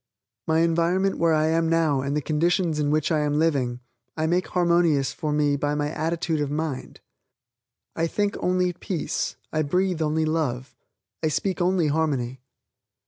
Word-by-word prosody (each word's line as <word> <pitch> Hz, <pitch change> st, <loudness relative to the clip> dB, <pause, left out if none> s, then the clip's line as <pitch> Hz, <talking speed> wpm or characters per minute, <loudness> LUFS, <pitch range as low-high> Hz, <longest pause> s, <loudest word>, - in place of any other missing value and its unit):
My 160 Hz, 0 st, +3 dB
environment 170 Hz, +4 st, +1 dB
where 165 Hz, -1 st, +3 dB
I 155 Hz, 0 st, +2 dB
am 165 Hz, 0 st, +1 dB
now 160 Hz, -5 st, +2 dB
and 140 Hz, +2 st, -1 dB
the 150 Hz, -, -2 dB
conditions 165 Hz, +1 st, +1 dB
in 145 Hz, -1 st, +1 dB
which 155 Hz, +1 st, +1 dB
I 155 Hz, -, +2 dB
am 150 Hz, 0 st, 0 dB
living, 135 Hz, -6 st, 0 dB, 0.4 s
I 155 Hz, -, 0 dB
make 175 Hz, +3 st, +1 dB
harmonize 170 Hz, -5 st, +2 dB
for 155 Hz, -3 st, -3 dB
me 150 Hz, -1 st, +2 dB
by 145 Hz, +1 st, -1 dB
my 150 Hz, 0 st, -1 dB
attitude 160 Hz, 0 st, -1 dB
of 145 Hz, -, -1 dB
mind. 150 Hz, -2 st, -4 dB, 0.9 s
I 165 Hz, -, 0 dB
think 205 Hz, +4 st, -1 dB
only 180 Hz, 0 st, +1 dB
peace, 175 Hz, -1 st, -3 dB, 0.2 s
I 155 Hz, -, +1 dB
breathe 180 Hz, +3 st, 0 dB
only 155 Hz, +1 st, +1 dB
love, 145 Hz, -5 st, -2 dB, 0.5 s
I 160 Hz, -, +1 dB
speak 180 Hz, +5 st, -1 dB
only 180 Hz, -1 st, +2 dB
harmony. 135 Hz, -5 st, -1 dB
160 Hz, 165 wpm, -24 LUFS, 150-170 Hz, 0.9 s, My